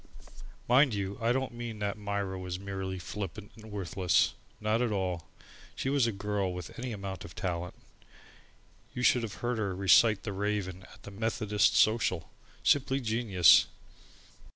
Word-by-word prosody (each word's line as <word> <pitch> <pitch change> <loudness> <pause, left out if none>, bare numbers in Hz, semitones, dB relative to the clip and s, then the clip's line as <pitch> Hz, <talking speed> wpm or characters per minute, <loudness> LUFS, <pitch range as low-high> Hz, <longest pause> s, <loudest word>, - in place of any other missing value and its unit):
Mind 130 -1 +5
you, 100 +1 -4
I 115 +1 +2
don't 130 0 -1
mean 120 -2 -6
that 100 -1 -2
Myra 100 -2 -3
was 90 -1 -4
merely 95 -1 -5
flippant 100 +2 -6
and 110 0 -13
worthless. 95 -2 +1 0.3
Not 110 +2 +1
at 120 -3 +1
all. 90 -5 -2 0.5
She 130 - -2
was 140 -4 +3
a - - 0
girl 100 -1 -2
with 90 -2 -7
any 125 0 -4
amount 100 -4 -6
of 85 - -11
talent. 90 -1 -3 1.2
You 125 - -3
should 125 - +4
have 110 -3 -5
heard 120 -1 0
her 100 -3 -1
recite 100 +2 +5
"The 105 - -4
Raven," 95 -2 -3
at - - -17
the 100 - -9
Methodist 105 0 +1
Social! 105 -7 +2 0.3
Simply 135 -1 +3
genius! 110 - +5
100 Hz, 155 wpm, -30 LUFS, 95-115 Hz, 1.2 s, Mind